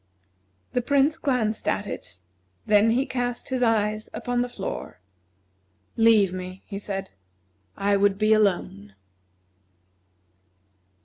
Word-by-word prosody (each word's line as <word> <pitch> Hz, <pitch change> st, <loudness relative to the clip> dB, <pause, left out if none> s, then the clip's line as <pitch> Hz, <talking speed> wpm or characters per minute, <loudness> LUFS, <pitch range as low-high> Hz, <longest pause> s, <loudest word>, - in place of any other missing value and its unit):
The 250 Hz, -, +1 dB
Prince 285 Hz, +4 st, +2 dB
glanced 250 Hz, -8 st, -1 dB
at 205 Hz, -, 0 dB
it 90 Hz, -, -8 dB, 0.4 s
and 215 Hz, -, -2 dB
then 210 Hz, +2 st, +5 dB
he 250 Hz, +4 st, +2 dB
cast 245 Hz, -3 st, -3 dB
his 260 Hz, -1 st, -1 dB
eyes 215 Hz, -2 st, +1 dB
upon 245 Hz, 0 st, -1 dB
the 245 Hz, -, -2 dB
floor. 195 Hz, -, -6 dB, 1.0 s
"Leave 220 Hz, -5 st, +4 dB
me," 185 Hz, 0 st, -7 dB
he 200 Hz, -2 st, -6 dB
said. 195 Hz, -2 st, -5 dB, 0.7 s
"I 200 Hz, 0 st, +2 dB
would 200 Hz, 0 st, +2 dB
be 215 Hz, +1 st, +3 dB
alone." 175 Hz, -, 0 dB
215 Hz, 120 wpm, -25 LUFS, 195-245 Hz, 1.0 s, then